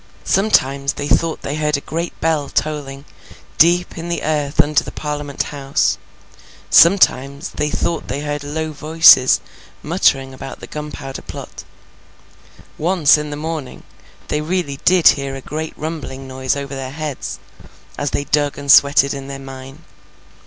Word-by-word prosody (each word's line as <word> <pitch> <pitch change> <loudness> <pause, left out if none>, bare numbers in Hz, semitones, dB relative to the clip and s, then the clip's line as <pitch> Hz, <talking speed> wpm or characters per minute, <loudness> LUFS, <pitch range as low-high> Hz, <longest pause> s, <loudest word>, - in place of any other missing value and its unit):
Sometimes, 140 -9 +2
they 145 - -4
thought 165 +2 0
they 145 +2 -3
heard 150 -1 +1
a - - -7
great 165 +4 -5
bell 155 -3 0
tolling, 145 -2 -3 0.5
deep 175 +2 +4
down - - -9
in - - -6
the 170 - -2
earth 150 -1 -2
under 150 -1 +4
the - - -8
Parliament 145 -1 -4
House; 140 -1 0 0.7
sometimes, 145 -5 +4
they 150 - -2
thought 170 - -2
they 140 - -3
heard 145 -1 -4
low 155 +2 -3
voices 155 -3 +6 0.4
muttering 135 -5 +1
about 135 +1 -9
the - - -9
Gunpowder 150 -3 -7
Plot; - - -9 1.2
once 165 -2 +4
in 150 0 -3
the 145 - -5
morning, 155 -3 -5 0.5
they 150 - 0
really 155 -4 -2
did 180 -2 +6
hear 140 -1 -1
a - - -6
great 155 +4 -6
rumbling 150 -4 -6
noise 130 0 -2
over 140 0 -5
their 135 -1 -5
heads, 150 -1 -5 0.6
as 145 - -2
they 140 - -2
dug 145 0 0
and 140 -1 +1
sweated 140 0 +6
in 135 -1 -7
their 140 0 -6
mine. 135 0 -11
145 Hz, 155 wpm, -18 LUFS, 140-155 Hz, 1.2 s, voices